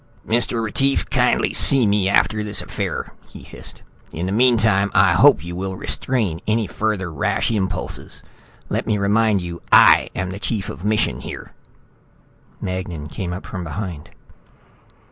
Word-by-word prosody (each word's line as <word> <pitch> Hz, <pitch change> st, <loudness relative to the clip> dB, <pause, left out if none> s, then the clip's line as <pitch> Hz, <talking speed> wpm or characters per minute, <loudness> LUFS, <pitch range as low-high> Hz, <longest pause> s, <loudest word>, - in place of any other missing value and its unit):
"Mr. 115 Hz, 0 st, +1 dB
Retief, 135 Hz, +5 st, 0 dB
kindly -, -, +1 dB
see 135 Hz, -4 st, +7 dB
me 100 Hz, -2 st, +1 dB
after 105 Hz, +2 st, +1 dB
this 105 Hz, -1 st, 0 dB
affair," -, -, -5 dB, 0.2 s
he -, -, -12 dB
hissed. -, -, -9 dB, 0.3 s
"In 85 Hz, +2 st, -4 dB
the 95 Hz, -, -3 dB
meantime, 110 Hz, -3 st, +3 dB
I -, -, +5 dB
hope 75 Hz, -, +4 dB
you 85 Hz, 0 st, -6 dB
will 95 Hz, +1 st, -4 dB
restrain 100 Hz, -5 st, -1 dB
any 110 Hz, +1 st, +1 dB
further 95 Hz, -4 st, -3 dB
rash 75 Hz, -, -1 dB
impulses. 95 Hz, -5 st, -4 dB, 0.4 s
Let -, -, -3 dB
me 105 Hz, -, +1 dB
remind 105 Hz, 0 st, +1 dB
you 85 Hz, -1 st, -7 dB
I -, -, +6 dB
am 95 Hz, 0 st, -3 dB
chief 110 Hz, -3 st, -3 dB
of 90 Hz, -, -9 dB
mission 105 Hz, +1 st, 0 dB
here." -, -, -9 dB, 1.1 s
Magnan 90 Hz, -5 st, -5 dB
came 90 Hz, +2 st, -5 dB
up 90 Hz, +2 st, -7 dB
from 90 Hz, -3 st, -6 dB
behind. 85 Hz, -4 st, -6 dB
100 Hz, 145 wpm, -20 LUFS, 90-110 Hz, 1.1 s, see